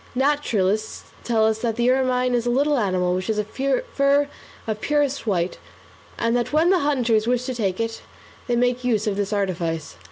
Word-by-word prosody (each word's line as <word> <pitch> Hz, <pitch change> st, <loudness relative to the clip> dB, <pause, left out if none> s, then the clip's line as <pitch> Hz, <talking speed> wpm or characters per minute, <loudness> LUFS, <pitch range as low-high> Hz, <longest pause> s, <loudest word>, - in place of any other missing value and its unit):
Naturalists 225 Hz, -7 st, 0 dB, 0.2 s
tell 225 Hz, -2 st, +2 dB
us 220 Hz, 0 st, +1 dB
that 230 Hz, -1 st, -1 dB
the 240 Hz, +1 st, +2 dB
ermine 255 Hz, -1 st, +1 dB
is 240 Hz, -1 st, 0 dB
a -, -, +2 dB
little 285 Hz, +3 st, +2 dB
animal 185 Hz, -4 st, +1 dB
which 185 Hz, +1 st, -2 dB
has 220 Hz, -1 st, -1 dB
a 210 Hz, -, +1 dB
fur 280 Hz, -, +1 dB, 0.4 s
of 215 Hz, -1 st, -3 dB
purest 285 Hz, -4 st, 0 dB
white, 180 Hz, -3 st, -1 dB, 0.6 s
and 230 Hz, +1 st, +1 dB
that 240 Hz, -1 st, -1 dB
when 320 Hz, +4 st, +3 dB
the 375 Hz, -, +4 dB
hunters 245 Hz, -7 st, +1 dB
wish 250 Hz, 0 st, +1 dB
to 260 Hz, -, -3 dB
take 200 Hz, -5 st, -2 dB
it, 225 Hz, 0 st, -3 dB, 0.5 s
they 240 Hz, -, +1 dB
make 245 Hz, +1 st, +1 dB
use 225 Hz, -4 st, +1 dB
of 210 Hz, -2 st, 0 dB
this 200 Hz, 0 st, -2 dB
artifice. 170 Hz, -, -2 dB
235 Hz, 190 wpm, -23 LUFS, 210-265 Hz, 0.6 s, the